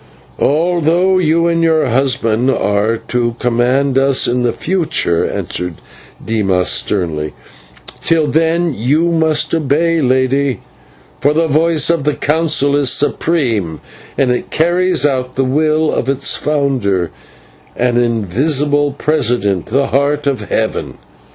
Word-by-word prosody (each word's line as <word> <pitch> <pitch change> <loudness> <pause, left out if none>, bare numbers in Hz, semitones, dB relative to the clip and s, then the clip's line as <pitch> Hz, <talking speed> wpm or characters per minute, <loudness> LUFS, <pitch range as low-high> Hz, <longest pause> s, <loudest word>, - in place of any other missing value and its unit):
"Although 175 +4 +2
you 165 0 +2
and 170 0 +1
your 160 -2 +2
husband 125 -2 0
are 105 -2 0
to 120 0 -2
command 125 +3 +1
us 135 -1 +2
in 125 +1 0
the 120 -1 +1
future," 160 - -1
answered 90 -2 -4 0.5
Dimas, 95 -5 0
sternly, 80 -7 -1 0.7
"till 165 -2 +2
then 165 +2 +1
you 150 +10 +1
must 160 -2 +1
obey, 165 +2 +1
Lady, 130 +1 +1 0.6
for 145 +2 +1
the 165 +1 +2
voice 160 +1 +2
of 165 -4 -1
the 150 0 0
Council 150 -2 +1
is 145 -3 +2
supreme, 120 - 0 0.4
and 135 -3 +2
it 125 - -3
carries 175 +1 +1
out 130 -3 -1
the 135 - 0
will 155 +3 +1
of 130 - -2
its 140 0 0
founder 130 - -1 0.6
and 120 0 +1
invisible 135 - 0
president, 120 - -1
the 135 +4 +1
Heart 145 +2 0
of 140 -2 -2
Heaven. 110 -1 -2
140 Hz, 125 wpm, -15 LUFS, 120-160 Hz, 0.7 s, Although